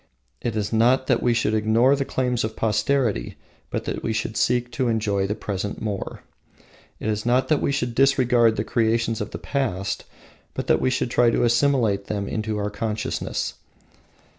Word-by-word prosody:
It 115 -2 -2
is 105 0 -2
not 125 +4 +3
that 125 -3 +2
we 120 - +2
should 115 -2 +1
ignore 110 +5 +3
the 140 -1 -2
claims 125 -3 -1
of 110 0 -3
posterity, 110 - 0 0.3
but - - -3
that - - -3
we 115 - -1
should 110 +1 -2
seek 120 +3 +1
to 130 +1 -1
enjoy 105 -4 0
the 105 - -2
present 100 -2 -4
more. 105 -3 -5 0.8
It - - -4
is 105 -1 -1
not 125 +2 +2
that 155 - +2
we - - +1
should 125 -4 -1
disregard 125 -3 +4
the 105 - -1
creations 115 -1 0
of - - -3
the - - -6
past, 110 -9 -2 0.5
but - - -3
that - - +2
we - - +2
should 125 -1 -1
try 120 -1 +4
to 115 - +1
assimilate 120 -5 +2
them 100 -2 -3
into 110 -1 -2
our 105 0 -2
consciousness. 105 +1 -3
115 Hz, 185 wpm, -23 LUFS, 105-125 Hz, 0.8 s, disregard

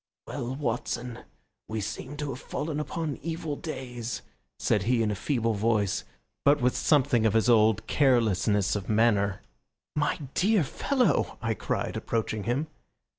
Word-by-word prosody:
"Well, 125 +2 -4
Watson, 120 -2 -3 0.5
we 110 0 -3
seem 130 +7 -5
to 145 -1 -3
have 130 - -6
fallen 150 +1 -3
upon 150 -1 -3
evil 160 -1 -3
days," 125 -7 -5 0.3
said 105 - +1
he 115 +3 +2
in 105 - +1
a - - -1
feeble 115 +1 0
voice, 105 -2 +1 0.4
but 145 +1 +5
with 125 -1 +2
something 135 -6 +3
of 110 - +1
his 110 - +3
old 110 -2 +4
carelessness 110 -8 +3
of 100 -2 -4
manner. 105 -3 +3 0.5
"My 145 -1 +1 0.2
dear 205 -1 +3
fellow!" 255 - +1
I 115 -1 0
cried, - - -2
approaching 110 -3 -2
him. 125 +7 0
120 Hz, 145 wpm, -28 LUFS, 110-145 Hz, 0.5 s, but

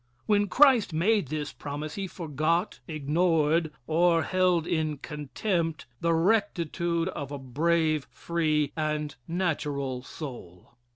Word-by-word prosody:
When 205 -1 +3
Christ 255 - +5
made 195 +2 +2
this 150 +1 -4
promise 145 +1 -5
he 195 -1 -3
forgot, 165 +2 -1
ignored, 160 +1 +1
or 165 +2 +3
held 180 -3 +2
in 155 -3 -1
contempt 160 +3 -2
the 170 0 +2
rectitude 170 -3 +1
of 145 -6 -6
a 145 - -4
brave, 155 +3 +1
free 155 -4 0
and 150 -1 -2
natural 145 -7 -1
soul. 120 - -9
160 Hz, 115 wpm, -28 LUFS, 150-175 Hz, -, Christ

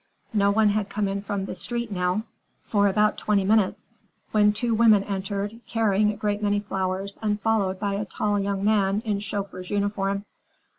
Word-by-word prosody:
No 200 -2 +3
one 215 +1 +4
had 205 -1 0
come 205 0 -1
in 195 0 -2
from 200 -1 -3
the - - -5
street 235 -2 -4
now 180 +2 0 0.4
for 205 -2 +2
about 210 +2 +2
twenty 205 -2 +1
minutes, 205 0 +1 0.4
when 210 -1 +4
two 230 +3 -1
women 220 -3 +5
entered, 200 +2 -3
carrying 210 -2 +2
a - - -6
great 205 -1 -1
many 205 -1 +1
flowers 195 -1 -3
and 210 -1 0
followed 200 -4 0
by 200 -1 -1
a 205 +2 -2
tall 205 +1 -1
young 200 0 -1
man 205 0 +2
in 205 -2 0
chauffeur's 200 -3 -5
uniform. 200 -1 -1
205 Hz, 180 wpm, -25 LUFS, 195-210 Hz, 0.4 s, women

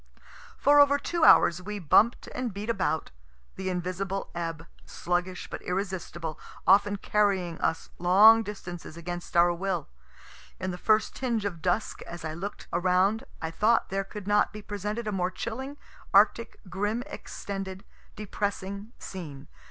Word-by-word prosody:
For 290 +1 +5
over 285 0 +6
two 340 +3 -2
hours 175 - +6
we 210 +3 -5
bump'd 205 +6 +3
and 250 -2 -3
beat 205 +4 -3
about, 185 -6 -1 0.4
the 190 0 -3
invisible 185 +2 -3
ebb, 165 -1 -4 0.2
sluggish 180 +1 -3
but - - -7
irresistible, 180 -4 -4 0.3
often 205 +1 +5
carrying 195 -5 0
us 165 - -1
long 205 +6 +7
distances 175 -6 -7
against 175 +1 -5
our 175 0 +6
will. 180 -2 -2 0.7
In 185 0 -2
the 180 - -7
first 215 +2 +2
tinge 235 -5 -1
of 175 -5 -4
dusk, 185 +4 -1
as 170 -1 -7
I 155 - -3
look'd 190 +6 -6
around, 185 +5 +2 0.2
I 160 - -2
thought 220 +7 +2
there 195 +1 -1
could 205 0 -9
not 205 0 +3
be 210 -1 -9
presented 210 +3 -4
a - - 0
more 180 -2 0
chilling, 260 +9 -5 0.4
arctic, 215 +3 +4
grim 205 +6 -2
extended, 195 -9 -6 0.3
depressing 200 +1 -4
scene. 150 -7 -8
195 Hz, 145 wpm, -28 LUFS, 175-210 Hz, 0.7 s, long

